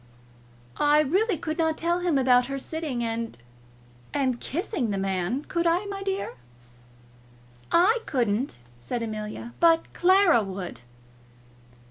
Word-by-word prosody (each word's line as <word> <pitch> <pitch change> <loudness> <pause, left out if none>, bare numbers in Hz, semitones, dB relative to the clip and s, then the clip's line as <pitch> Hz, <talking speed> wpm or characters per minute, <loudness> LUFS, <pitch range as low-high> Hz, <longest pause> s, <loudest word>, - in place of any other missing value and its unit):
"I 295 +1 +5
really 375 - +1
could 310 +2 -4
not 320 -1 +1
tell 340 +1 +1
him 350 -5 +1
about 250 -2 +4
her 275 0 -3
sitting 285 -4 -3
and 230 - -3 0.8
and 260 -4 0
kissing 320 - -2
the 200 - -1
man. 195 +7 -1
Could 340 0 0
I, 345 +4 +2
my 400 -1 -5
dear?" 390 - -3 1.3
"I 390 +8 +4
couldn't," 240 - 0 0.2
said 230 - -4
Amelia; 215 +1 -6
"but 330 -1 +3
Clara 370 - +5
would." 190 -7 -6
285 Hz, 125 wpm, -26 LUFS, 230-345 Hz, 1.3 s, I